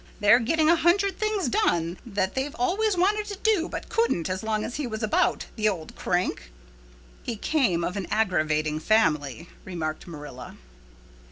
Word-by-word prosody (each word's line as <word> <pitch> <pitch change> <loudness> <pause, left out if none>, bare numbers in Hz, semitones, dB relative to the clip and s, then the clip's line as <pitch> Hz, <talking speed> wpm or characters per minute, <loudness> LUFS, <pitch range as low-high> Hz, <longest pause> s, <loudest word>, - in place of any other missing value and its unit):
They're 210 +3 +6
getting 310 +6 +2
a 335 - +6
hundred 365 +3 +2
things 430 -5 0
done 170 -6 +1
that 195 -3 -1
they've 275 +3 -3
always 375 +3 +1
wanted 415 +4 +2
to 405 - -5
do 405 -5 +1
but - - -6
couldn't 450 - 0
as 185 0 -3
long 215 -1 -1
as 245 - -4
he 290 -4 -2
was 220 -1 -5
about, 215 - +1
the 215 -1 +2
old 170 -6 -6
crank." 175 - -2 0.7
"He 235 - -4
came 215 - +1
of 180 - -2
an 195 -3 -4
aggravating 155 -7 +1
family," 155 - +1 0.2
remarked 160 -4 -5
Marilla. 145 -6 -9
220 Hz, 165 wpm, -26 LUFS, -, 0.7 s, They're